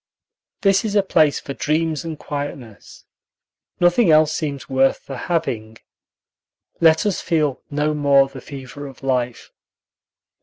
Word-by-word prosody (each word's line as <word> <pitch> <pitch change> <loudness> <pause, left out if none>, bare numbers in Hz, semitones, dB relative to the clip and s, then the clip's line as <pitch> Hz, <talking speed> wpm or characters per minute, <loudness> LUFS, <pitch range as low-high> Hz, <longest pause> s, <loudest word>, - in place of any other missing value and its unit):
This 195 -1 +3
is 215 -2 -2
a 200 - +4
place 155 -6 +3
for 140 - -7
dreams 155 +2 -1
and 160 -2 -5
quietness. 140 -8 -7 0.7
Nothing 175 +3 +4
else 155 0 +5
seems 145 -4 -4
worth 135 0 +1
the 135 - -7
having. 115 -10 -2 1.0
Let 160 +2 +4
us 205 -3 0
feel 150 -6 0
no 150 +1 0
more 140 -2 +4
the 135 -1 -11
fever 140 +1 -9
of 135 0 -14
life. 125 -3 -2
145 Hz, 130 wpm, -21 LUFS, 135-165 Hz, 1.0 s, else